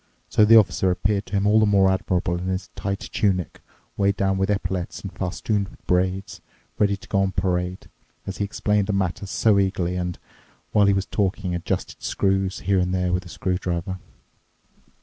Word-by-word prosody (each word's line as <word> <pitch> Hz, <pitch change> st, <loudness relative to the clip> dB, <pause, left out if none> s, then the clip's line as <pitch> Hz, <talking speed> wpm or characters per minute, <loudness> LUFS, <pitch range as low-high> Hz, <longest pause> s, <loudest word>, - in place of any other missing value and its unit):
So 105 Hz, -, +5 dB
the 115 Hz, +2 st, +7 dB
Officer 95 Hz, -3 st, +3 dB
appeared 100 Hz, +3 st, 0 dB
to -, -, -12 dB
him 100 Hz, 0 st, +1 dB
all 105 Hz, +1 st, +5 dB
the 110 Hz, -, +4 dB
more 95 Hz, -2 st, +4 dB
admirable 90 Hz, -2 st, 0 dB
in 90 Hz, -, -4 dB
his 95 Hz, 0 st, -3 dB
tight 100 Hz, 0 st, -4 dB
tunic 95 Hz, -4 st, 0 dB, 0.3 s
weighed 100 Hz, 0 st, +1 dB
down 95 Hz, -1 st, +1 dB
with 95 Hz, -, +1 dB
epaulettes 95 Hz, -3 st, -2 dB
and 100 Hz, -, -6 dB
festooned 100 Hz, +1 st, -2 dB
with -, -, -19 dB
braid, 95 Hz, +1 st, +1 dB, 0.6 s
ready 100 Hz, -1 st, +2 dB
to -, -, -15 dB
go 100 Hz, -, +1 dB
on 95 Hz, 0 st, 0 dB
parade, 90 Hz, 0 st, -1 dB, 0.4 s
as 100 Hz, -, -5 dB
he -, -, -1 dB
explained 105 Hz, 0 st, 0 dB
the 105 Hz, -, 0 dB
matter 95 Hz, 0 st, -1 dB
so 100 Hz, +1 st, +3 dB
eagerly 90 Hz, -2 st, 0 dB
and, 90 Hz, -1 st, -3 dB, 0.5 s
while 105 Hz, -1 st, +4 dB
he 100 Hz, -, +5 dB
was 95 Hz, 0 st, 0 dB
talking, 95 Hz, -2 st, -1 dB
adjusted 85 Hz, -1 st, -3 dB
screws 95 Hz, -1 st, 0 dB
here 95 Hz, 0 st, +2 dB
and 90 Hz, 0 st, 0 dB
there 90 Hz, -1 st, 0 dB
with 90 Hz, 0 st, -1 dB
a -, -, -12 dB
screwdriver. 90 Hz, 0 st, -2 dB
95 Hz, 190 wpm, -23 LUFS, 90-100 Hz, 0.6 s, the